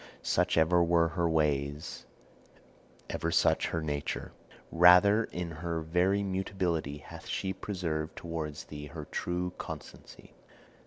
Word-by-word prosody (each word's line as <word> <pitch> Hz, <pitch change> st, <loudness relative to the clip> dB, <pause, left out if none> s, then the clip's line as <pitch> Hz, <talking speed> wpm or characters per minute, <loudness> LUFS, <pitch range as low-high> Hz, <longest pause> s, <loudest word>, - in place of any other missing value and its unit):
Such -, -, +1 dB
ever 85 Hz, +2 st, +4 dB
were 85 Hz, -1 st, +3 dB
her 85 Hz, 0 st, 0 dB
ways, 75 Hz, -2 st, -1 dB, 1.0 s
ever 85 Hz, -, -2 dB
such -, -, +3 dB
her 85 Hz, -1 st, -2 dB
nature. 75 Hz, -2 st, -3 dB, 0.4 s
Rather 90 Hz, +6 st, +7 dB
in 90 Hz, -1 st, -5 dB
her 80 Hz, +1 st, -3 dB
very 90 Hz, +5 st, +1 dB
mutability 95 Hz, -6 st, -2 dB
hath -, -, -11 dB
she 95 Hz, 0 st, -2 dB
preserved 85 Hz, -6 st, -3 dB
towards 80 Hz, -3 st, -5 dB
thee 75 Hz, -1 st, -8 dB
her 75 Hz, +1 st, -8 dB
true 90 Hz, +3 st, -3 dB
constancy. -, -, -9 dB
85 Hz, 120 wpm, -30 LUFS, 80-90 Hz, 1.0 s, Rather